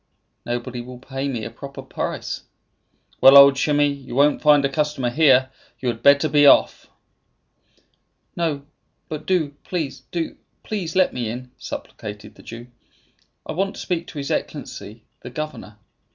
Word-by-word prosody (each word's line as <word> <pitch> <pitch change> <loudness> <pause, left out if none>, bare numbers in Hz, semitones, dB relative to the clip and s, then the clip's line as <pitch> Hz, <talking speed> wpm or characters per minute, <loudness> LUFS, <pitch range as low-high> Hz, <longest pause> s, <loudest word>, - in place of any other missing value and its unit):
"Nobody 120 +1 -3
will 125 +1 -10
pay 135 +2 -5
me 120 -6 -3
a 115 - -6
proper 140 +3 -9
price." 130 - -4 0.8
"Well, 135 +1 +9
old 140 0 +9
Shimei, 145 +1 +2
you 140 -3 -4
won't 145 +2 +3
find 145 -2 +5
a - - +4
customer 140 -3 -1
here. 130 -3 +4 0.3
You 130 - -1
had 115 -1 -4
better 140 +2 +5
be 145 -1 +5
off." - - +4 1.5
"No; 155 -5 -2 0.4
but 155 0 -6
do, 180 -6 +1
please 160 -7 -4
do, 170 -2 -3 0.3
please, 185 -6 -4
let 185 -1 +3
me 120 -3 -3
in," 125 +2 -7
supplicated 105 0 -8
the - - -17
Jew. 115 +1 -9 0.8
"I - - -5
want 195 +3 -2
to - - -7
speak 175 -2 -3
to - - -10
his 140 -1 -4
Excellency, 110 +2 -5
the - - -9
governor." 130 -6 -7
140 Hz, 155 wpm, -22 LUFS, 125-150 Hz, 1.5 s, Well